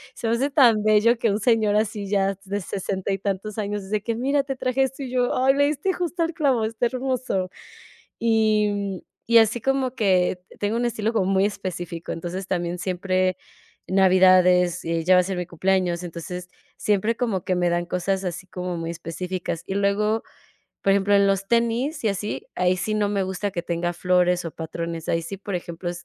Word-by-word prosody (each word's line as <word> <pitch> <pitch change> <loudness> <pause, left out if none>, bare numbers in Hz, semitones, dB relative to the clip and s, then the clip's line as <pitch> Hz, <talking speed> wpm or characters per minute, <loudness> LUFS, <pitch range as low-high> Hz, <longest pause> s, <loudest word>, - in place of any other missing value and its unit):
Se 230 - -4
me 225 - +2
hace 275 +4 0
tan 240 -7 +5
bello 215 +2 +4
que 230 - +2
un 200 - 0
señor 215 -2 +2
así 210 -2 -1
ya 195 -1 +2
s 195 - -10
de 200 +1 -3
sesenta 190 +1 -3
y 195 - -2
tantos 200 +2 -3
años 205 -1 -3
dice: 205 +2 -2
"Que, 230 +2 -2
mira, 275 +4 +1
te 270 -1 -4
traje 255 +1 -1
esto", 265 +1 -3
y 250 - -6
yo: 250 -1 +1
"Ay, 265 +1 +4
le 285 +1 +3
diste 305 +6 -1
justo 350 -1 -2
el 330 - -2
clavo, 270 -8 +1
está 225 +2 0
hermoso". 255 -7 -2 0.7
Y, 220 -2 +3
mm, 200 -2 -3 0.3
y 235 0 +6
así 225 +2 +3
como 265 -1 0
que 185 -5 +2
te - - -17
tengo 205 +2 -1
un 240 - 0
estilo 220 -1 -1
como 210 -5 +1
muy 190 0 +3
específico. 180 -4 -5
Entonces, 180 +3 -5
también 175 -1 -2
siempre 185 0 0 0.5
navidades, 185 -2 +4
ya 165 +2 +2
va 180 - +6
a - - -3
ser 190 0 -3
mi 180 -1 -3
cumpleaños, 180 0 0
entonces 180 +1 -7 0.3
siempre 210 +2 +1
como 215 -8 -1
que 185 - 0
me 175 0 +1
dan 175 0 0
cosas 190 +2 -1
así 180 +1 -4
como 180 -1 -4
muy 165 0 -3
específicas. 170 +1 -5
Y 190 - -4
luego, 210 +2 +1 0.6
por 195 - +4
ejemplo, 200 +1 +3
en 200 0 +5
los 195 0 0
tenis 235 +5 +1
y - - +2
así, 205 +2 -4
ahí 180 0 +2
sí 200 +4 -2
no 205 -1 +1
me 200 -2 0
gusta 190 +2 -3
que 170 -2 -4
tenga 175 0 -1
flores 180 0 +2
o 165 - -4
patrones. 165 0 -5
Ahí 165 - +1
sí, 195 +4 -5
por 200 -1 -5
ejemplo, 175 0 -5
195 Hz, 205 wpm, -24 LUFS, 180-225 Hz, 0.7 s, y